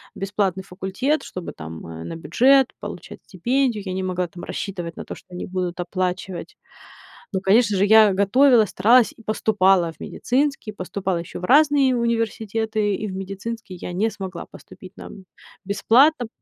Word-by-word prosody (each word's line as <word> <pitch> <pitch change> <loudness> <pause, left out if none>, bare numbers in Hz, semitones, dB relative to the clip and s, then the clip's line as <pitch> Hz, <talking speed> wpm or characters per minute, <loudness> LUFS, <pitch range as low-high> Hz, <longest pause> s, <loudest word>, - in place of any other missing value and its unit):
бесплатный 195 -1 -1
факультет, 195 +11 -2
чтобы 180 -2 -7
там, 80 +1 -9
э, 80 0 -8
на 85 - -6
бюджет, 265 +10 +4
получать - - -8
стипендию. 235 +3 0
Я 185 - -3
не 190 0 -3
могла 180 -1 -2
там 175 +1 -11
рассчитывать 175 -4 -5
на - - -7
то, - - -7
что - - -17
они 180 - -5
будут 180 -1 -4
оплачивать. 185 - -4 0.7
Ну, 190 -1 -2
конечно 205 +1 +3
же, 200 - +3
я 215 -1 +6
готовилась, 220 +3 +4
старалась 230 +5 +4
и 225 - -17
поступала 195 -5 +2
в - - -21
медицинский, 275 -3 -1
поступала 190 -1 -3
ещё 170 - -7
в - - -12
разные 280 -1 +4
университеты. 220 -2 -1
И 215 - -4
в 190 - -6
медицинский 195 +1 -6
я 180 - -7
не 215 +5 +1
смогла 190 -3 -7
поступить 185 0 -14
на, - - -9
м, 190 -2 -12 0.4
бесплатно. 240 +7 +3
200 Hz, 165 wpm, -22 LUFS, 185-230 Hz, 0.7 s, я